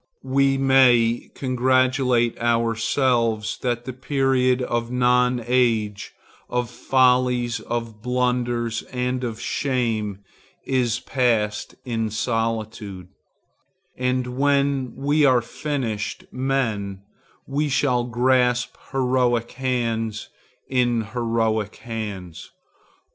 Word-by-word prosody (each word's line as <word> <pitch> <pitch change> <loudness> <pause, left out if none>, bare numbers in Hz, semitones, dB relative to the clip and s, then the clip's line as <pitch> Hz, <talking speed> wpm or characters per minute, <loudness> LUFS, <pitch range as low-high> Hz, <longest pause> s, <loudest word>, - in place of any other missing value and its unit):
We 135 +1 +2
may 125 -4 +4
congratulate 130 -2 +2
ourselves 115 -1 +1
that 120 -1 -1
the 130 - -5
period 130 -1 +1
of 120 -1 -2
nonage, 125 -3 +1 0.4
of 125 -1 -2
follies, 125 -2 +2
of 115 -2 -5
blunders 120 -1 0
and 125 0 -2
of 115 -2 -4
shame, 110 -8 -1 0.4
is 125 -3 +1
passed 115 -6 0
in 115 -3 -1
solitude, 110 -4 -3 0.9
and 125 0 -1
when 140 -2 +1
we 145 +3 +1
are 130 -3 +5
finished 120 -6 -4
men 115 -7 -2 0.4
we 145 +2 -1
shall 130 -3 +2
grasp 125 0 +1 0.2
heroic 125 -3 +1
hands 115 -4 -2 0.4
in 120 -3 +1
heroic 115 -3 0
hands. 105 -7 -7
125 Hz, 90 wpm, -23 LUFS, 115-130 Hz, 0.9 s, are